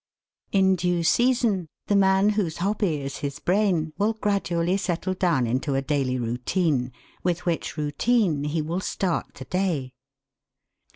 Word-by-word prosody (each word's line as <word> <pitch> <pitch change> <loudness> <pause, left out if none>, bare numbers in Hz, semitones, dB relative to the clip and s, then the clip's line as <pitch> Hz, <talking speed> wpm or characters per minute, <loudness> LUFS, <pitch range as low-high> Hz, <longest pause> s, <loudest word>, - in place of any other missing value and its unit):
In 190 -1 +4
due 175 -1 0
season 235 -2 +2 0.2
the 205 - +1
man 195 +1 +4
whose 200 -7 -1
hobby 190 -5 0
is 135 0 -5
his 140 -1 -4
brain 180 -3 +1
will 210 +2 +2
gradually 190 -5 0
settle 185 -1 -2
down 170 -9 +1
into 130 +4 -1
a 135 - +1
daily 135 -3 0
routine, 125 +3 0 0.3
with 175 0 -1
which 170 -2 -2
routine 150 +1 +1
he 155 +1 -1
will 165 +4 -2
start 185 -2 -2
the 130 - -9
day. 165 -9 -1
175 Hz, 140 wpm, -25 LUFS, 145-195 Hz, 0.3 s, In